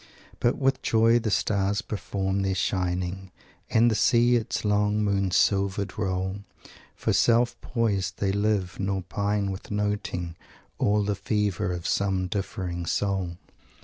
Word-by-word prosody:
But 120 - +2
with 135 -1 +1
joy 115 +1 +4
the 110 -2 -2
stars 100 +2 +1
perform 100 -2 -2
their 95 -1 0
shining 90 +2 -1 0.4
And 115 +1 +4
the - - +2
sea 120 +3 +4
its 115 -1 -1
long, 105 0 +2
moon 100 -2 +1
silvered 100 +1 +1
roll; 95 -1 -2 0.6
For - - -1
self 115 +5 +3
poised 100 -6 -1
they 100 -1 0
live; 100 -2 0
nor 95 -1 -1
pine 100 0 -1
with 95 - -8
noting 105 -5 -2 0.4
All 105 0 +2
the 100 0 0
fever 100 -2 -1
of 90 -1 -5
some 95 -2 +1
differing 90 -3 -4
soul." 95 -3 -1
100 Hz, 140 wpm, -26 LUFS, 95-105 Hz, 0.6 s, joy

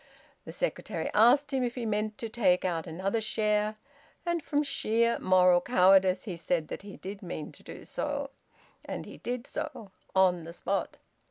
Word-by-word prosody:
The - - -7
secretary - - -3
asked 245 +7 +5
him 260 -1 +1
if 240 -1 -2
he 245 -2 -3
meant 215 0 -1
to 230 - -4
take 195 -6 +2
out 170 -3 -1
another 190 +7 -1
share, 215 0 0 0.5
and 345 -1 0
from 295 0 +1
sheer 235 -4 +1
moral 180 -1 +5
cowardice 185 -3 +4
he 180 -5 -5
said 165 -1 -1
that - - -5
he 200 0 -10
did 195 +1 -7
mean 175 -5 -6
to - - -14
do - - -10
so; - - -3 0.5
and - - -5
he - - -11
did 245 0 -4
so, 205 -7 -6 0.2
on 180 -3 +4
the 165 +1 -8
spot. 195 +3 -2
210 Hz, 175 wpm, -29 LUFS, 185-235 Hz, 0.5 s, asked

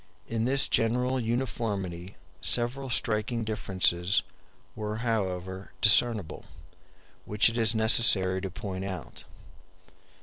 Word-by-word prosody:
In 115 0 -2
this 135 +2 +2
general 125 +3 +1
uniformity 105 -7 -3 0.3
several 125 +3 0
striking 115 0 -1
differences 95 -3 0 0.5
were 105 0 -4
however 95 -4 -3
discernible, 105 -3 +3 0.8
which 105 +3 +3
it 115 - -5
is 115 0 +3
necessary 110 -4 +4
to 95 - -4
point 95 0 -6
out. 95 -2 -7
110 Hz, 100 wpm, -28 LUFS, 95-115 Hz, 0.8 s, necessary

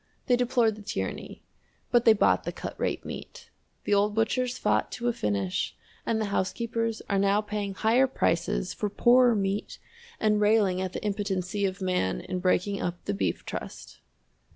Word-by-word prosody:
They 250 - +4
deplored 240 -3 +2
the - - -10
tyranny, 95 - -5 0.5
but 240 -1 +4
they 225 - +8
bought 210 - +3
the - - -3
cut - - -6
rate - - -2
meat - - -9 0.3
the - - 0
old 205 +1 +2
butchers 250 +3 0
fought - - +1
to 240 0 -3
a 240 - +2
finish, 100 - -1 0.3
and 225 - +1
the 215 - 0
housekeepers 230 +3 -1
are 200 - +1
now 200 +1 +3
paying 205 -2 -4
higher 235 +6 +3
prices 170 -6 0
for 210 - -2
poorer 240 +3 +5
meat 195 0 -2 0.4
and 210 -1 +2
railing 205 -3 +3
at 190 -1 -3
the - - -5
impotency 200 -1 -1
of 190 0 -3
man 180 - 0
in 185 - -4
breaking 185 +2 +1
up 175 0 -4
the - - -1
Beef 95 -3 -2
Trust! - - -7
205 Hz, 175 wpm, -27 LUFS, 185-225 Hz, 0.5 s, they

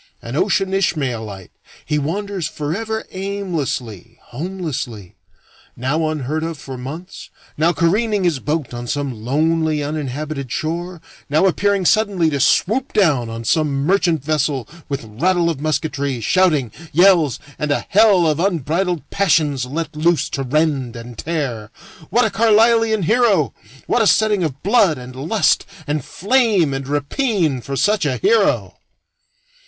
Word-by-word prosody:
An - - -7
ocean 195 -1 +1
Ishmaelite, 120 - -2 0.3
he 150 -1 0
wanders 190 +3 -3
forever 205 +10 -3
aimlessly, 155 - -4
homelessly; 130 - -5 0.6
now 150 +6 -1
unheard 155 0 -2
of 165 -1 -4
for 135 -1 -8
months, 150 +9 -8 0.3
now 160 +3 +3
careening 200 +5 +1
his 170 -6 +1
boat 150 -2 -2
on 120 0 -6
some 140 0 -2
lonely 155 +3 +1
uninhabited 145 -2 -4
shore, 170 +2 -3 0.3
now 155 +6 +3
appearing 195 +1 +1
suddenly 200 -6 +2
to 140 - -1
swoop 230 - +2
down 145 - +2
on 115 0 -6
some 140 +2 +1
merchant 175 -5 +2
vessel 145 -4 0 0.2
with 140 -3 -3
rattle 170 +10 +1
of 145 -4 -6
musketry, 140 -3 -1
shouting, 150 - +2 0.2
yells, 170 - +4 0.2
and 150 - -2
a 145 - 0
hell 205 -4 +5
of 155 -1 +1
unbridled 170 -2 -1
passions 150 -9 +1
let 155 +3 -4
loose 165 +2 +1
to 135 - -2
rend 135 -2 0
and 115 0 -9
tear. 135 -10 -3 0.4
What 240 +4 +3
a 220 - 0
Carlislean 225 0 +3
hero! 215 - +2 0.3
What 240 - +1
a 220 - +3
setting 210 -3 +3
of 140 -4 -4
blood 200 -5 +3
and 125 0 -10
lust 160 +11 +1 0.2
and 150 -2 -2
flame 205 - +2
and 135 0 -4
rapine 150 - 0
for 140 +3 -5
such 200 - +2
a 130 -3 -1
hero! 215 - +2
155 Hz, 140 wpm, -19 LUFS, 135-190 Hz, 0.6 s, hell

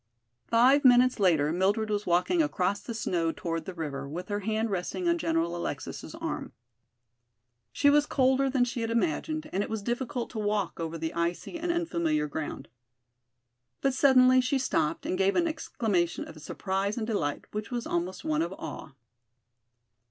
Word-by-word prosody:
Five 255 +5 +5
minutes 250 -1 +5
later 160 -6 +3
Mildred 200 +5 +1
was 210 0 -1
walking 180 - +3
across 200 -10 0
the 235 - -6
snow 170 -6 0
toward 165 0 -4
the 190 - -6
river, 140 -4 -4
with 175 +6 -6
her 205 0 -1
hand 220 +2 -1
resting 195 - -2
on 340 0 +2
General 165 - 0
Alexis' 145 -6 -5
arm. - - -5 1.2
She 285 - +2
was 295 +1 +5
colder 265 0 +2
than 255 -2 +2
she 240 0 -4
had 225 - -1
imagined 310 +5 -1
and 195 - +1
it - - -3
was 220 -2 -3
difficult 240 +2 -3
to 225 - -5
walk 205 -4 -1
over 165 0 -3
the 160 0 -3
icy 170 - -2
and 345 +1 -1
unfamiliar 170 - 0
ground. 145 -2 -5 1.1
But 270 - +2
suddenly 255 -1 +6
she 255 +2 +1
stopped 165 -11 0
and 185 - -1
gave 195 +1 +3
an 345 -1 +3
exclamation 215 - -1
of 155 -1 -11
surprise 195 +6 -2
and 225 - -1
delight 170 -11 -2
which 210 0 -4
was 240 -2 -3
almost 175 +2 -3
one 155 0 +1
of 170 +2 -1
awe. 160 -5 -8
205 Hz, 170 wpm, -28 LUFS, 170-255 Hz, 1.2 s, suddenly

